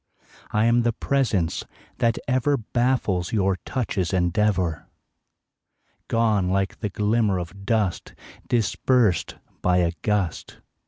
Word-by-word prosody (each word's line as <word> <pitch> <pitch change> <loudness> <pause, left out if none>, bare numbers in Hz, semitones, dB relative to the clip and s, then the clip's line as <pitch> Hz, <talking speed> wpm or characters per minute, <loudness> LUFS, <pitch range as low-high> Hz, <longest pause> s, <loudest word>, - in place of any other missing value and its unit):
I 105 +1 +1
am 120 +1 +4
the 120 0 +1
presence 110 - 0 0.4
that 115 -1 +2
ever 130 +3 +2
Baffles 120 -6 0
your 95 -3 +1
touch's 100 -9 -1
endeavor, 90 -1 0 1.2
Gone 110 -5 +2
like 95 +1 -1
the 105 - -2
glimmer 105 0 +1
of 95 +3 -7
dust 105 -6 -1 0.3
Dispersed 115 -3 +1 0.3
by 90 0 +2
a 85 -2 +2
gust. 100 -6 -1
105 Hz, 110 wpm, -24 LUFS, 90-115 Hz, 1.2 s, am